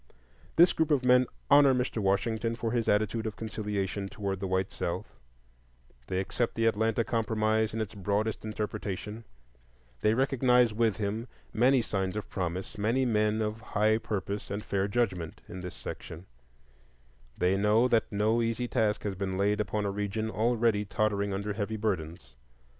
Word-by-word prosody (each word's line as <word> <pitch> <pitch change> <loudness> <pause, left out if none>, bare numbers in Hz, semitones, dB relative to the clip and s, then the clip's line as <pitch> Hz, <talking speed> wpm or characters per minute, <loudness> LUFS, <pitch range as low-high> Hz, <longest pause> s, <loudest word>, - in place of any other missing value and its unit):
This 175 +2 +6
group 160 -1 +1
of 145 -4 +2
men 125 0 +5 0.2
honor 140 -2 +7
Mr. 125 -2 -1
Washington 110 +4 0
for 115 -1 -2
his 120 -1 0
attitude 110 +2 +1
of 105 - -5
conciliation 105 -3 -3
toward 100 -2 -3
the 95 - -3
white 95 0 0
South; - - -4 0.9
they 95 - -1
accept 115 +5 -1
the 115 - +1
"Atlanta 115 +1 +2
Compromise" 110 -1 +1
in 115 - -4
its 110 -3 -3
broadest 105 +2 -1
interpretation; 105 0 -4 0.7
they 105 - +2
recognize, 125 -3 +3
with 110 -2 +1
him, 110 +3 -2 0.3
many 125 +2 +4
signs 95 -3 -2
of 105 - -5
promise, 95 +3 -4
many 115 +6 +2
men 110 -1 +2
of 110 +1 -3
high 110 0 +2
purpose 100 -1 -4
and 100 +2 -4
fair 100 0 0
judgment, 100 -7 -1
in 90 +1 -7
this 90 0 -7
section; 80 +3 -8 1.1
they 90 +2 +2
know 105 +5 +4
that 115 -3 +1
no 110 +3 +2
easy 115 +1 -1
task 110 -4 0
has 105 - -2
been 95 0 -3
laid 105 +2 +2
upon 105 +1 -2
a 100 - 0
region 105 +2 -2
already 115 -2 +2
tottering 100 -1 0
under 100 +2 -2
heavy 110 +1 -3
burdens. 85 - -3
105 Hz, 160 wpm, -29 LUFS, 100-115 Hz, 1.1 s, honor